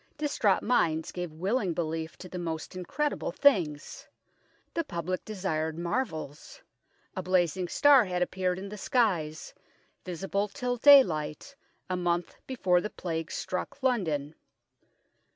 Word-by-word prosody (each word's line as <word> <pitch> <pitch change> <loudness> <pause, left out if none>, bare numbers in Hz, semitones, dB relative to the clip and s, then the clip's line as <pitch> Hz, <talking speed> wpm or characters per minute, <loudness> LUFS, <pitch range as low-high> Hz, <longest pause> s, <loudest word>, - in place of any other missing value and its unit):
Distraught 285 -9 +1
minds 160 -10 +1
gave 175 -2 -5
willing 185 +3 -1
belief 160 -1 -3
to 185 - -9
the 180 0 -6
most 165 +1 -5
incredible 285 - -2
things. 170 - +1 0.7
The 335 - 0
public 180 - -4
de 215 - -6
sired 160 -4 -2
marvels. 170 - -4 0.5
A - - -2
blazing 185 0 +1
star 280 +2 +6
had 180 -1 0
appeared 180 0 -1
in 195 +1 -6
the 210 0 -8
skies, 175 -11 0 0.5
visible 195 +3 -2
till 245 +2 -3
daylight, 235 - +5 0.3
a 185 - -1
month 175 -1 -1
before 185 -9 +2
the 210 - -4
Plague 165 -5 -4
struck 185 +9 -4
London. 160 - 0
180 Hz, 130 wpm, -29 LUFS, 165-215 Hz, 0.7 s, star